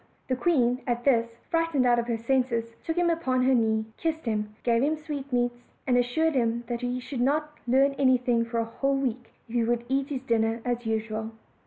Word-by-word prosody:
The 255 - +2
queen 255 -5 +2
at 240 0 -1
this, 235 -4 +3 0.2
frightened 330 -5 +2
out 240 -1 +4
of 235 - -2
her 235 -1 0
senses, 230 -1 0
took 325 +1 -3
him 350 -1 +3
upon 260 -6 0
her 265 +1 +4
knee, 220 -2 +2
kissed 320 -2 -2
him, 210 -2 -2
gave 235 -1 +2
him 300 +3 +2
sweetmeats, 265 -6 -2 0.2
and 250 - +2
assured 245 +7 +2
him 235 -2 0
that 235 0 -4
he 245 0 -2
should 250 0 -5
not 300 +3 0
learn 270 +3 +4
anything 250 -3 +3
for 230 0 -4
a 230 - 0
whole 275 +4 -1
week, 250 -3 -3 0.2
if 230 - -12
he 240 -1 +2
would 235 +1 0
eat 270 +1 +1
his 265 -3 -4
dinner 225 -2 +1
as 245 -1 -2
usual. 220 0 -2
245 Hz, 205 wpm, -27 LUFS, 230-275 Hz, 0.2 s, out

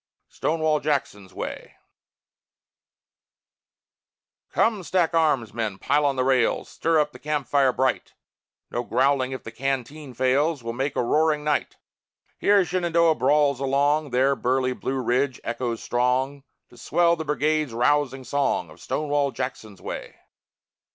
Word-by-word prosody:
STONEWALL 155 -1 0
JACKSON'S 135 -11 -2
WAY - - -7 2.8
Come, 220 -3 +1
stack 175 0 0
arms, 150 -10 +1
men! 110 -4 -3
Pile 145 +7 +1
on 140 - 0
the 130 - +1
rails, 130 -2 +1
Stir 165 -1 +1
up 150 0 +1
the - - -13
camp 150 -2 -2
fire 140 -2 +3
bright; 130 +1 -1 0.6
No 120 - -1
growling 130 +1 +1
if 130 - -6
the 115 - -8
canteen 135 +2 -4
fails, 135 +3 +1
We'll 115 0 -4
make 135 +3 -2
a - - +1
roaring 150 +3 +2
night. 150 -1 -1 0.6
Here 200 -2 +4
Shenandoah 170 -2 +2
brawls 140 0 +2
along, 145 +2 +1
There 130 +2 +2
burly 130 0 0
Blue 130 +1 -3
Ridge 130 +2 0
echoes 120 -1 -3
strong, 130 +3 0 0.2
To 120 - -18
swell 170 +6 +2
the 160 - -5
Brigade's 150 -1 0
rousing 135 +2 +1
song 130 - -1
Of 80 +2 -16
"Stonewall 145 - 0
Jackson's 125 -7 -6
way." - - -6
140 Hz, 135 wpm, -24 LUFS, 125-150 Hz, 2.8 s, Here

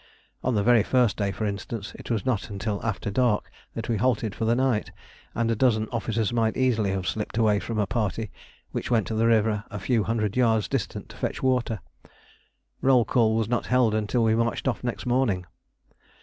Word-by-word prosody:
On 125 -2 +1
the 100 - +2
very 120 -1 +5
first 120 0 +2
day, 100 -2 0
for 110 - -3
instance, 100 +1 -4
it - - -11
was 115 -5 -1
not 125 -6 -1
until 100 0 -3
after 105 -1 -2
dark 120 -1 +1 0.2
that 115 - -4
we 115 - 0
halted 110 -2 +1
for 115 - -3
the 115 +1 +3
night, 130 -4 0 0.4
and 115 0 +1
a - - +1
dozen 110 -2 +2
officers 115 -1 -1
might 115 -2 +1
easily 115 -6 +2
have 95 -2 -2
slipped 110 0 -3
away 110 -3 +3
from 115 +1 -4
a 105 - +2
party 110 -1 -2 0.4
which - - -4
went 115 -4 +2
to - - -4
the 110 +1 +2
river 110 -2 +2
a 105 - -6
few 110 +2 +1
hundred 110 -2 -1
yards 115 -4 +2
distant - - -3
to - - -12
fetch - - -3
water: 125 -6 +1 1.0
roll 130 -3 +4
call 110 -3 +2
was 110 -2 +1
not 120 +1 -1
held 125 -4 +3
until 110 +2 +1
we 110 -1 +3
marched 115 +3 0
off 125 -2 -1
next 120 +1 -3
morning. 120 -8 +1
115 Hz, 205 wpm, -26 LUFS, 105-120 Hz, 1.0 s, very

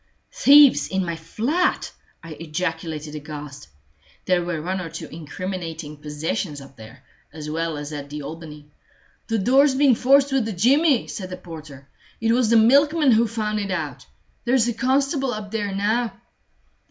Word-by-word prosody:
"Thieves 285 0 +6
in 190 -1 -1
my 170 -1 -3
flat!" 240 - -1 0.3
I 165 - -10
ejaculated 160 -1 -4
aghast. 150 - -8 0.6
There 180 -1 +2
were 170 -2 -3
one 185 +4 -3
or 165 - -6
two 160 - -7
incriminating 165 -1 -6
possessions 150 +2 -4
up 135 0 -14
there, 115 +3 -14 0.3
as 150 0 -7
well 165 0 -2
as 145 +1 -6
at 145 -1 -6
the 150 0 -6
Albany. 150 -1 -10 0.6
"The 225 -1 0
door's 265 +6 +4
been 275 -1 +5
forced 275 +4 +4
with 265 -4 +1
a 220 - -3
jimmy," 270 - +3
said 185 -4 -6
the 185 - -6
porter. 155 -6 -11 0.3
"It 225 0 +1
was 240 -1 +2
the 230 - +5
milkman 285 +5 +4
who 230 +1 +4
found 215 -1 -2
it 200 -1 -3
out. 150 -8 -4 0.4
There's 245 -1 +2
a 240 - 0
constable 270 +1 0
up 210 -1 -7
there 210 -3 -2
now." 215 +4 0
185 Hz, 165 wpm, -22 LUFS, 155-240 Hz, 0.6 s, Thieves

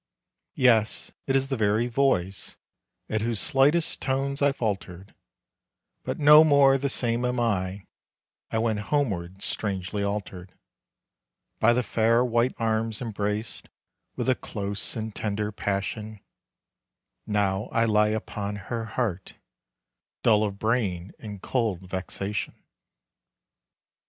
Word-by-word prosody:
Yes, 115 -4 +3 0.2
it 135 - +1
is 135 0 +1
the 135 - 0
very 110 0 +2
voice, 115 -7 0 0.5
At 110 -1 -1
whose 115 -1 -1
slightest 145 - +2
tones 135 +1 -1
I 140 0 +4
faltered 100 -6 -4 0.9
But - - -3
no 150 +1 +8
more 140 -3 +5
the 140 +1 -1
same 120 -2 0
am 125 0 0
I; 100 -4 -1 0.6
I - - -1
wend 110 -2 0
homeward 100 -10 -1
strangely 100 0 -2
altered. 95 -3 -4 1.0
By 120 +2 +5
the 125 +1 +1
fair 115 +2 +2
white 120 +1 +1
arms 110 -1 -1
embraced 105 -2 -4 0.5
With - - -3
a 130 - +5
close 100 -4 -3
and 110 -1 -4
tender 105 0 -2
passion, 105 +2 -3 1.1
Now 100 -2 0
I 115 0 +2
lie 105 -1 +3
upon 105 -1 -3
her 115 +3 -4
heart, 105 -4 -3 0.9
Dull 110 -2 +4
of 100 -2 -2
brain, 100 -5 -1
in 105 -2 -7
cold 110 -8 -1
vexation. 95 +2 -4
110 Hz, 120 wpm, -26 LUFS, 100-125 Hz, 1.1 s, no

